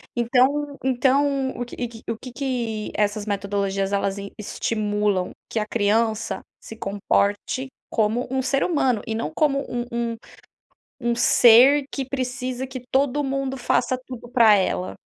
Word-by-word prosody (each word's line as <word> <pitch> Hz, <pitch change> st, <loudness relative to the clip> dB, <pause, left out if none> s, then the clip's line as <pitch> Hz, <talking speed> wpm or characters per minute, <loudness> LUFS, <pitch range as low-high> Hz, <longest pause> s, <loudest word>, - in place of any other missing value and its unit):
Então 270 Hz, +4 st, +2 dB
então 265 Hz, +1 st, +2 dB
o 245 Hz, -, -3 dB
que 240 Hz, 0 st, -5 dB
que 225 Hz, -1 st, -13 dB
o 230 Hz, -, -2 dB
que 255 Hz, +2 st, -10 dB
que 235 Hz, -5 st, -3 dB
essas 210 Hz, 0 st, 0 dB
metodologias, 200 Hz, -1 st, -1 dB
elas 200 Hz, 0 st, 0 dB
em 200 Hz, 0 st, -7 dB
estimulam? 210 Hz, -3 st, -1 dB, 0.2 s
Que 225 Hz, -, -1 dB
a 210 Hz, -, -1 dB
criança 220 Hz, +1 st, 0 dB, 0.2 s
se 225 Hz, -, -10 dB
comporte 205 Hz, +5 st, 0 dB, 0.2 s
como 225 Hz, +2 st, 0 dB
um 265 Hz, 0 st, +1 dB
ser 275 Hz, +1 st, +1 dB
humano, 265 Hz, -, +1 dB
e 220 Hz, -, -2 dB
não 190 Hz, -9 st, -3 dB
como 275 Hz, -, +2 dB
um 240 Hz, 0 st, -3 dB
um 235 Hz, -1 st, -2 dB, 0.9 s
um 235 Hz, 0 st, +1 dB
ser 245 Hz, +4 st, +6 dB
que 270 Hz, -, -3 dB
precisa 255 Hz, -1 st, -3 dB
que 260 Hz, -1 st, -7 dB
todo 280 Hz, +2 st, +2 dB
mundo 270 Hz, -1 st, -2 dB
faça 255 Hz, +1 st, +1 dB
tudo 245 Hz, -2 st, -9 dB
pra 235 Hz, -4 st, +6 dB
ela. 185 Hz, -1 st, -1 dB
240 Hz, 150 wpm, -23 LUFS, 210-265 Hz, 0.9 s, ser